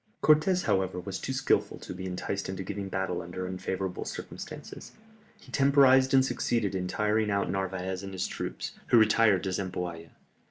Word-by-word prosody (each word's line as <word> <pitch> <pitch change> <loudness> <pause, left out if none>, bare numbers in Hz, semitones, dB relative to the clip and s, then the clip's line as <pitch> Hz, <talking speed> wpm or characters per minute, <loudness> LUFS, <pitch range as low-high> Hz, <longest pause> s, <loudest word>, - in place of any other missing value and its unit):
Cortès, 155 +5 +4
however, 95 -1 0
was 90 - -5
too - - -4
skilful - - +1
to - - -8
be 95 +1 -6
enticed 95 +2 -3
into 95 0 -4
giving 100 +1 -5
battle 95 -2 -2
under 90 +2 -5
unfavourable 95 0 -3
circumstances. - - -8 0.5
He - - -16
temporized 135 -1 +5
and 130 -1 +5
succeeded 115 -5 0
in 90 -1 -2
tiring 105 +2 +1
out 100 0 0
Narvaez 95 -1 -2
and 100 0 -7
his 95 - -2
troops, - - -4 0.2
who 120 - +5
retired 110 -3 +4
to 95 - -1
Zempoalla. 90 -3 -4
95 Hz, 165 wpm, -29 LUFS, 95-110 Hz, 0.5 s, temporized